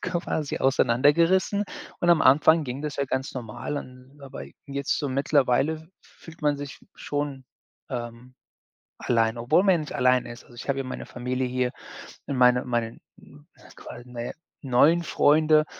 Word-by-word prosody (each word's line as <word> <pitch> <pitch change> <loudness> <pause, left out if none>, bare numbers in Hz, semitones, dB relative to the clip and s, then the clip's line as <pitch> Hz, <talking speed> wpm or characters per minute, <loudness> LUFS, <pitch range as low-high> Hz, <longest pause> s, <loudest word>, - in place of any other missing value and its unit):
quasi 160 -4 -2
auseinandergerissen 145 - +3 0.4
und 175 - +3
am 170 - +5
Anfang 155 +4 +5
ging 130 +2 -5
das 150 -2 -4
ja 140 - 0
ganz 130 +4 -3
normal 125 +4 -5
an 130 +2 -13
aber 135 - -8 0.2
jetzt 140 0 -2
so 145 - -2
mittlerweile 140 +2 +2
f 160 +1 -15
fühlt 165 -1 -16
man 145 -1 +2
sich 145 0 -8 0.2
schon, 145 -2 -4 0.5
ähm, 120 0 -7 0.7
allein, 115 -1 +1
obwohl 145 +10 +2
man 185 -5 +3
nicht 150 - -7
alleine 125 -1 +2
ist. 120 - -11
Also, 120 - -17
ich 120 - -9
habe 135 0 0
ja - - -2
meine 130 - -6
Familie 125 +1 -3
hier 125 0 -1 0.6
in 140 - -2
meine 125 0 +4
meinen, 120 -2 -2 0.2
hm, 75 - -18 0.3
quasi, 120 - -10
na 120 -1 -7
ja, - - -4 0.3
neuen 145 +6 +3
Freunde, 155 0 +4
135 Hz, 165 wpm, -25 LUFS, 125-150 Hz, 0.7 s, am